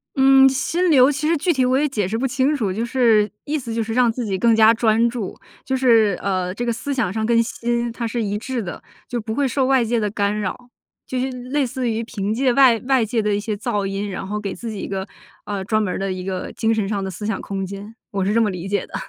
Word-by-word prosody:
嗯， 270 0 +6
心 330 +7 0
流 260 -3 +6
其 290 +1 -2
实 330 +1 +2
具 345 +4 +1
体 260 -3 +2
我 255 +1 +2
也 300 - +2
解 220 -8 -1
释 220 +4 -2
不 265 +3 0
清 265 +3 +1
楚。 215 -9 -1
就 225 +4 -2
是 230 -4 +3 0.2
意 300 +1 -1
思 240 -5 -5
就 230 - -1
是 225 0 -3
让 245 -1 +3
自 240 +1 -4
己 195 -3 -1
更 230 +4 +3
加 220 0 +6
专 225 0 +2
注， 230 -5 -5 0.3
就 265 - -1
是 225 -7 +4
呃， 185 -2 -1
这 240 +5 -4
个 235 - 0
思 280 +5 -4
想 245 -9 0
上 220 0 -1
跟 230 0 +3
心 235 +1 -2
它 235 0 -4
是 230 +1 -2
一 205 -1 -1
致 245 +2 -3
的， 180 -5 -7 0.3
就 240 -2 -3
不 220 +1 -4
会 280 +3 +1
受 260 +1 0
外 260 -2 +3
界 235 +1 0
的 210 -1 0
干 205 0 -1
扰。 245 +5 -5 0.4
就 255 - -2
是 260 +1 -1
类 255 +3 -2
似 250 0 -2
于 225 0 -1
凭 210 -3 -3
借 255 +2 +2
外 255 -3 +6
外 265 -3 +3
界 225 +1 0
的 210 -1 0
一 - - -1
些 215 +1 -3
噪 205 -1 -2
音， 195 +1 -3
然 190 - -5
后 210 +2 -3
给 200 -2 -4
自 230 +5 -6
己 210 - -6
一 - - -5
个， 190 -1 -3 0.4
呃 200 -2 -3
专 215 +2 +1
门 205 -4 -1
儿 - - -4
的 195 0 -2
一 185 0 -4
个 185 -1 -4
精 225 0 +1
神 215 -3 -1
上 200 -1 -2
的 190 - -4
思 200 +4 -7
想 220 - -2
空 195 -1 -4
间。 200 +3 -8 0.2
我 195 -2 -1
是 200 - +1
这 230 - +3
么 215 - +2
理 180 -2 -5
解 200 +1 -1
的。 - - -22
225 Hz, 300 characters per minute, -21 LUFS, 205-255 Hz, 0.4 s, 嗯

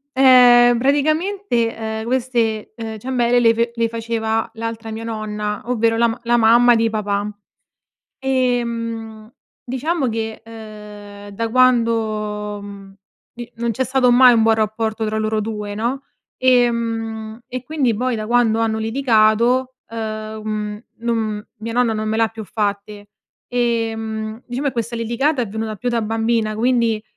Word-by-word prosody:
ehm, 245 -2 +6
praticamente, 290 - 0
ehm, 220 0 -4
queste, 235 -4 -1
uhm, 225 -2 -6
ciambelle 245 +1 +1
le 230 -1 +4
fe 235 +1 0
le 230 0 +1
faceva 225 -1 -2
l'altra 225 0 -5
mia 220 +1 -6
nonna, 210 -2 -4
ovvero 230 -2 +1
la 235 +1 +3
ma 225 +1 -4
la 240 +1 +3
mamma 240 +1 +5
di 225 0 +2
papà. 205 -1 -2 0.9
Ehm, 230 -4 -2 0.3
diciamo 265 +3 -1
che, 220 0 -4
uhm, 210 -2 -11
da 230 +2 -2
quando, 220 -4 +1
mhmm, 200 -1 -11 0.4
di 240 0 -9
non 235 0 -1
c'è 245 +3 0
stato 260 0 +2
mai 245 0 +7
un 230 - +3
buon 225 0 +4
rapporto 220 +1 -1
tra 215 0 -2
loro 215 0 0
due, 210 -1 -5
no, 240 +6 -2 0.4
Ehm, 230 -3 +1
e 255 0 -5
quindi 280 -6 0
poi 250 +3 -1
da 215 -1 -4
quando 230 -1 +2
hanno 225 -1 0
litigato, 235 +1 +2 0.2
uhm, 215 -1 -5
mhmm, 210 0 -4 0.2
non 220 -3 -2
mia 225 +2 -6
nonna 245 -1 +2
non 215 0 -2
me 215 - -1
l'ha 225 0 +2
più 220 0 -8
fatte, 205 0 -4 0.4
e, 235 -2 0
mhmm, 220 +1 -5
diciamo 260 +4 -2
che - - 0
questa 235 -1 -3
litigata 245 +5 0
è 230 - -3
venuta 220 +1 -4
più 245 +5 -3
da 235 -1 0
bambina 225 0 0
quindi, 230 -2 +1
225 Hz, 150 wpm, -20 LUFS, 215-240 Hz, 0.9 s, mai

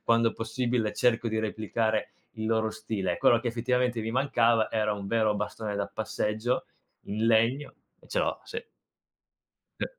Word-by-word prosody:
quando 115 -1 +3
possibile 115 -1 -1
cerco 120 -1 +2
di 110 0 -1
replicare 110 0 -1 0.3
il 110 0 -3
loro 110 -1 +1
stile 110 -4 -2
e - - -4
quello 120 - +5
che 120 - -6
effettivamente 125 0 0
mi 110 +1 -3
mancava 120 -3 +3
era 105 -1 +1
un 100 -1 -6
vero 110 0 +2
bastone 105 0 -3
da 100 - -1
passeggio 110 +3 -1 0.4
in 110 +2 -1
legno 115 +6 +2 0.3
e - - -20
ce - - -1
l'ho - - 0
sì. 455 0 -5 1.2
E - - 0
110 Hz, 160 wpm, -28 LUFS, 110-120 Hz, 1.2 s, quello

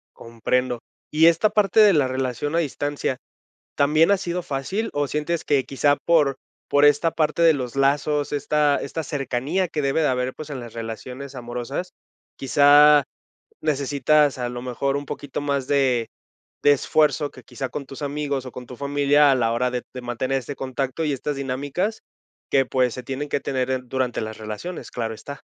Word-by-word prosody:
Comprendo. 120 +2 -1 0.3
Y 155 +2 +4
esta 170 +6 +4
parte 210 0 +2
de 210 -3 +7
la 145 -4 +3
relación 130 +3 -2
a 170 - +3
distancia, 145 -3 -2 0.6
¿también 155 +5 +4
ha 200 - +5
sido 180 -1 -3
fácil 175 +10 -3
o 145 0 0
sientes 150 +3 -2
que 140 -3 +2
quizá 145 +1 +2
por 150 -5 +3 0.3
por 145 +1 +4
esta 145 +3 +4
parte 155 +1 0
de 165 -1 +7
los 130 -5 -4
lazos, 145 +1 +1
esta 145 0 +2
esta 160 - -4
cercanía 145 +5 -1
que 155 -3 -3
debe 140 +3 +1
de 150 - +3
haber, 125 0 -1
pues, 155 -1 -9
en 135 -3 -5
las 120 -2 -9
relaciones 125 +4 -7
amorosas? 125 +8 -5 0.5
Quizá 145 +2 +6 0.6
necesitas 145 0 +2
a 125 -1 -2
lo 120 0 -6
mejor 130 +3 -1
un 145 - -6
poquito 140 0 -5
más 140 -2 -1
de 130 -5 +2 0.6
de 145 - +6
esfuerzo 150 +1 +1
que 130 - -14
quizá 130 +1 -6
con 140 +3 -6
tus 135 +1 -10
amigos 145 -2 -2
o 130 - -7
con 125 0 -9
tu 125 - -10
familia 145 0 +3
a - - +4
la 115 -3 +1
hora 125 +1 0
de 125 -1 -3
de 125 - -6
mantener 125 +2 -2
este 140 +3 -7
contacto 135 +4 -3
y 150 - 0
estas 145 +2 -3
dinámicas 140 +11 -2 0.5
que, 135 -1 +4
pues 125 -1 +1
se 125 - -7
tienen 135 +4 -4
que - - 0
tener 130 -1 -1
en 130 -1 -3
durante 130 -2 -1
las 110 0 -5
relaciones, 110 +12 -7
claro 115 -2 -3
está. 140 +5 -9
140 Hz, 185 wpm, -23 LUFS, 130-150 Hz, 0.6 s, de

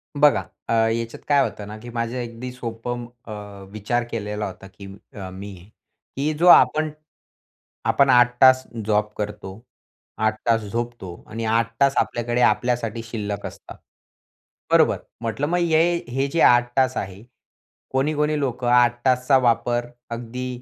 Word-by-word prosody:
बघा, 145 0 +4 0.3
अ, - - 0
याच्यात 115 +1 0
काय 145 -1 +4
होतं 105 -5 -5
ना, 105 - -8
की 120 - -10
माझं 115 +1 -2
अगदी 120 +2 -7
सोपं 120 0 -5 0.2
अ, 110 - -9 0.4
विचार 110 +3 -1
केलेला 105 -1 -3
होता 95 +1 -10
की 100 +1 -13 0.3
अ, 95 -3 -7
मी 100 +1 -8 0.6
की 145 +3 0
जो 170 +4 +1
आपण 155 0 +6 1.0
आपण 140 -1 +3
8 125 -1 +6
तास 130 0 +7 0.2
जॉब 105 0 +1
करतो, 105 0 -6 0.6
8 110 0 0
तास 115 -1 +3
झोपतो, 115 -6 -5
आणि 115 +1 -4
8 115 +1 +1
तास 140 0 +5
आपल्याकडे 120 +1 0
आपल्यासाठी 120 -2 +1
शिल्लक 105 -3 -5
असतात. - - -10 0.9
बरोबर? - - +4 0.2
म्हटलं 120 +5 -2
मग 175 - 0
हे 165 -2 +3 0.3
हे 135 +3 -1
जे 165 +4 -2
8 120 0 +5
तास 130 -1 +2
आहे, 95 +2 -5 0.7
कोणी-कोणी 150 +2 0
लोकं 125 -3 -2
8 120 -1 +4
तासचा 130 +1 +4
वापर 120 0 +1 0.3
अगदी 120 +2 -5
120 Hz, 145 wpm, -23 LUFS, 110-130 Hz, 1.0 s, तास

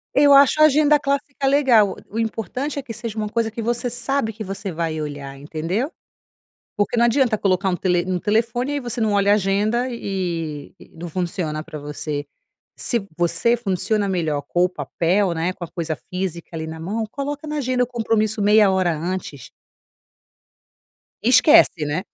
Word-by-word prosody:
Eu 285 0 +6
acho 280 +2 +6
a - - +9
agenda 300 0 +4
clássica 280 0 -2
legal. 255 -8 +4
O 220 - -4
importante 230 - -3
é - - -3
que 250 -4 -8
seja 225 -1 -6
uma 215 -1 -2
coisa 225 0 -1
que 230 +1 -5
você 240 +2 -1
sabe 245 0 -1
que 215 +1 -7
você 195 0 -5
vai 160 -1 -3
olhar, 145 -2 -6
entendeu? 165 - -3 0.9
Porque 205 +4 0
não 235 - +4
adianta 235 -2 +2
colocar 195 -1 +1
um 180 - 0
tele 175 -1 +1
um 185 -1 0
telefone. 235 +7 0
Aí 285 - -1
você 240 -2 -4
não 220 -2 +1
olha 200 0 +3
a - - +6
agenda 210 +5 +1
e 170 - -4
e - - -15
não 170 +1 -7
funciona 170 -3 -3
para 155 - -8
você. 145 0 -4 0.5
Se 235 -5 -1
você 175 +7 +2
funciona 205 -1 -1
melhor 160 -6 -1
com 175 0 +2
o - - +2
papel, 180 +1 0
né, 165 +3 -1
com 185 -1 -8
a - - -8
coisa 165 -2 -3 0.2
física 180 -2 -4
ali 160 0 -4
na 160 0 -7
mão, 210 +7 -2
coloca 285 +3 -5
na 300 0 -3
agenda 255 -2 +1
o - - -9
compromisso 225 -3 0
meia 210 0 +5
hora 185 -2 +1
antes. 165 -4 -5 1.7
Esquece, 250 - +5
né, 155 +6 -2
205 Hz, 180 wpm, -21 LUFS, 175-240 Hz, 1.7 s, a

